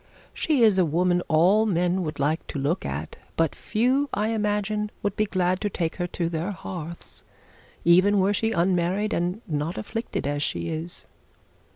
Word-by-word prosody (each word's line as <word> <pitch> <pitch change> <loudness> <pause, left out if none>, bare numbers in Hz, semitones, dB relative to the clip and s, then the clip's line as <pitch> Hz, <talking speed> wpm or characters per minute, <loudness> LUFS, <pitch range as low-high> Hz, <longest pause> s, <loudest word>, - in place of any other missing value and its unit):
She 290 -7 +2
is 210 -4 +5
a - - +6
woman 175 +3 +2
all 185 +8 +4
men 180 -1 +1
would 155 -3 -4
like 150 +3 0
to - - -5
look 145 +7 -1
at; 70 +3 -5 0.2
but 165 -2 +1
few 260 +6 +1
I 210 +2 0
imagine 210 -1 0
would 205 -1 -1
be 215 - +2
glad 185 -1 0
to 205 - 0
take 165 -4 -2
her 175 -1 -1
to 170 -1 -2
their 165 +2 -2
hearths, 170 -4 -7 0.6
even 185 +4 +5
were 195 +2 +3
she 225 +2 0
unmarried 185 +4 +1
and 180 +6 -1
not 155 +3 -2
afflicted 225 - -4
as 145 0 -1
she 165 - -1
is.' 165 +2 -5
180 Hz, 175 wpm, -25 LUFS, 165-210 Hz, 0.6 s, a